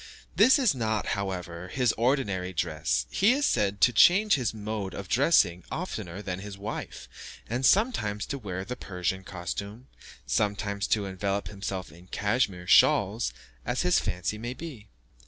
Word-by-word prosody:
This 260 Hz, -, +6 dB
is 255 Hz, -, +3 dB
not, 110 Hz, -4 st, -1 dB
however, 90 Hz, -3 st, -4 dB
his 125 Hz, +3 st, +1 dB
ordinary 110 Hz, -7 st, 0 dB
dress; 75 Hz, -8 st, -1 dB
he 220 Hz, +5 st, +4 dB
is 285 Hz, +2 st, +1 dB
said 100 Hz, -2 st, +1 dB
to 125 Hz, -, +5 dB
change 200 Hz, -, +6 dB
his 125 Hz, -7 st, +1 dB
mode 105 Hz, -3 st, -5 dB
of 100 Hz, -, -6 dB
dressing 110 Hz, -, +3 dB
oftener 105 Hz, -, -5 dB
than 95 Hz, -2 st, -4 dB
his 100 Hz, 0 st, -8 dB
wife, 100 Hz, -, -6 dB, 0.4 s
and 120 Hz, +4 st, -2 dB
sometimes 130 Hz, -, +2 dB
to 140 Hz, -, -5 dB
wear 95 Hz, -4 st, -5 dB
the 125 Hz, -, -5 dB
Persian 95 Hz, -1 st, -3 dB
costume, 100 Hz, +7 st, -6 dB, 0.4 s
sometimes 100 Hz, -1 st, -1 dB
to 105 Hz, -2 st, +1 dB
envelop 100 Hz, +1 st, -2 dB
himself 95 Hz, -4 st, -5 dB
in 85 Hz, +4 st, -16 dB
cashmere 105 Hz, -3 st, -1 dB
shawls, -, -, +4 dB, 0.3 s
as -, -, -1 dB
his -, -, +3 dB
fancy 90 Hz, +4 st, -3 dB
may 120 Hz, +3 st, -5 dB
be. 130 Hz, -11 st, -9 dB
100 Hz, 155 wpm, -27 LUFS, 95-125 Hz, 0.4 s, This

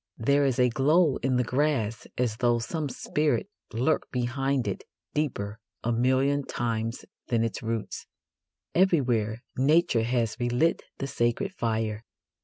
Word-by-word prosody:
There 140 Hz, +5 st, +3 dB
is 130 Hz, -2 st, 0 dB
a 125 Hz, -1 st, +4 dB
glow 150 Hz, +4 st, +3 dB
in 130 Hz, -1 st, 0 dB
the 125 Hz, -, +3 dB
grass 125 Hz, -4 st, 0 dB
as 120 Hz, -3 st, 0 dB
though 120 Hz, -1 st, +3 dB
some 150 Hz, +5 st, -3 dB
spirit 155 Hz, +9 st, -1 dB, 0.2 s
lurked 125 Hz, +7 st, 0 dB
behind 130 Hz, 0 st, 0 dB
it 100 Hz, -, -3 dB, 0.3 s
deeper 110 Hz, -8 st, -2 dB, 0.2 s
a 120 Hz, -, +1 dB
million 130 Hz, +4 st, +2 dB
times 115 Hz, -1 st, -3 dB, 0.2 s
than 115 Hz, -2 st, +1 dB
its 115 Hz, -, -2 dB
roots. 115 Hz, -1 st, -4 dB, 0.7 s
Everywhere 125 Hz, -, +2 dB, 0.2 s
Nature 150 Hz, -2 st, +4 dB
has 115 Hz, -1 st, 0 dB
relit 120 Hz, +7 st, +2 dB, 0.2 s
the 135 Hz, -, -3 dB
sacred 135 Hz, +10 st, 0 dB
fire. 110 Hz, -, -1 dB
125 Hz, 135 wpm, -27 LUFS, 115-140 Hz, 0.7 s, a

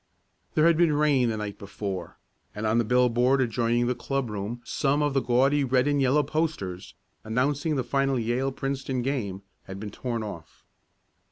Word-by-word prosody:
There 155 Hz, -, +4 dB
had 170 Hz, -1 st, +5 dB
been 170 Hz, -3 st, +4 dB
rain 145 Hz, -5 st, +3 dB
the 110 Hz, -, -2 dB
night 105 Hz, -1 st, -5 dB
before, 100 Hz, -3 st, -6 dB, 0.4 s
and 105 Hz, +1 st, -3 dB
on 110 Hz, +2 st, +3 dB
a -, -, 0 dB
billboard 125 Hz, +3 st, +3 dB
adjoining 120 Hz, -1 st, +1 dB
the 125 Hz, -, +1 dB
club 130 Hz, -1 st, -3 dB
room 105 Hz, +4 st, -4 dB
some 145 Hz, +1 st, +1 dB
of 145 Hz, -1 st, 0 dB
the 135 Hz, -, +2 dB
gaudy 135 Hz, +4 st, +3 dB
red 130 Hz, 0 st, +2 dB
and 145 Hz, -1 st, +2 dB
yellow 135 Hz, +3 st, +3 dB
posters, 145 Hz, -, -3 dB, 0.3 s
announcing 140 Hz, +7 st, 0 dB
the 130 Hz, -, 0 dB
final 135 Hz, +2 st, +1 dB
Yale 120 Hz, +4 st, 0 dB
Princeton 135 Hz, -1 st, -3 dB
game, 105 Hz, -8 st, -2 dB, 0.2 s
had 95 Hz, 0 st, -8 dB
been 105 Hz, 0 st, -6 dB
torn 120 Hz, 0 st, -3 dB
off. 85 Hz, -6 st, -9 dB
125 Hz, 175 wpm, -26 LUFS, 110-140 Hz, 0.4 s, had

